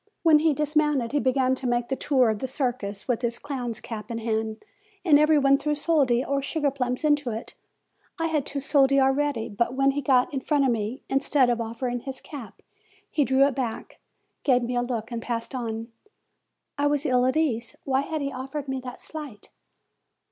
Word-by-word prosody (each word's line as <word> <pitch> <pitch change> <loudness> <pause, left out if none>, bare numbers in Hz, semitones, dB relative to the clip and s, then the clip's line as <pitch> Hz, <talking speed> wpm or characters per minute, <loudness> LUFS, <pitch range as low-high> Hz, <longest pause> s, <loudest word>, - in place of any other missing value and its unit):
When 315 -3 +6
he 310 -1 +2
dismounted, 300 -4 +1
he 290 - +1
began 260 -1 +2
to 260 -1 -3
make 240 0 0
the 270 - 0
tour 260 -5 +2
of 215 - -4
the 260 - -3
circus, 245 -7 -3
with 245 -2 0
his 235 -1 -1
clown's 250 -5 -4
cap 215 -1 -7
in 230 - -3
hand, 220 - -2 0.4
and 295 -4 +6
every 305 0 +5
body 275 0 +5
threw 300 +1 -1
soldi 280 -6 +2
or 280 0 0
sugar 290 0 0
plums 250 -1 -2
into 295 -3 +2
it. 225 0 -6 0.7
I 330 - 0
had 315 -3 0
two 280 +1 -4
soldi 275 -1 +4
ready; 270 -3 +1
but 235 +4 -1
when 275 +1 +3
he 285 +1 -2
got 255 0 +3
in 270 - 0
front 285 +1 +1
of 260 - +3
me, 225 +2 -3
instead 270 -2 +3
of 235 -1 -1
offering 240 +2 -3
his 265 +1 -6
cap, 275 -7 -10 0.5
he 295 - +2
drew 265 +1 +4
it 280 - +1
back, 240 -4 -4 0.4
gave 250 -3 +3
me 245 +1 -2
a 245 - +2
look 240 -2 -3
and 235 -1 -3
passed 230 +2 -4
on. 230 -2 -4 0.9
I 290 - +3
was 290 0 +1
ill 250 -3 +3
at 260 - +1
ease. 245 -7 0
Why 270 0 +1
had 310 +2 -3
he 280 0 -2
offered 270 +2 -5
me 265 0 -2
that 250 -1 -8
slight? 295 -10 -9
265 Hz, 205 wpm, -26 LUFS, 240-285 Hz, 0.9 s, When